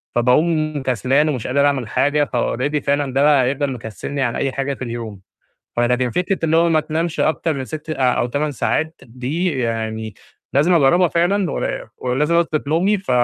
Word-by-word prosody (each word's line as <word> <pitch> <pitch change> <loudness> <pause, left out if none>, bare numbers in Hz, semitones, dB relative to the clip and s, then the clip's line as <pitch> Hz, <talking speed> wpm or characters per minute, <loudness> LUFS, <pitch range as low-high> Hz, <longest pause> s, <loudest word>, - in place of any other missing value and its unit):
فباقوم 155 +4 +2
كسلان 130 +4 +1
ومش 130 -6 -3
قادر 140 +2 +2
أعمل 135 -5 0
حاجة 145 +5 +1
فalready 130 +4 0
فعلًا 140 -2 0
ده 135 +1 +3
بقى 140 -4 +4
يفضل 140 0 -1
مكسّلني 120 +4 -5
عن 120 -3 0
أي 135 -1 -1
حاجة 140 +1 -2
في 130 - -7
اليوم. 115 -5 -6 0.6
فلكن 125 +1 +1
فكرة 180 - -1
اللي 160 0 +2
هو 170 +1 +4
ما 160 -1 +3
تنامش 160 +2 -2
أكتر 155 +1 +1
من 135 - -4
6 155 +3 -7
أ - - -1 0.2
أو - - 0
8 145 +4 -2
ساعات 160 +5 -1
دي 135 +6 -3
يعني 110 -2 -3 0.4
لازم 155 +6 +3
أجرّبها 170 +4 +4
فعلًا، 175 +2 +1
ول - - -3
ولازم 140 +6 0
أضبط 160 -4 +1
نومي 190 +6 +2
ف 190 - -7
140 Hz, 180 wpm, -20 LUFS, 125-160 Hz, 0.6 s, بقى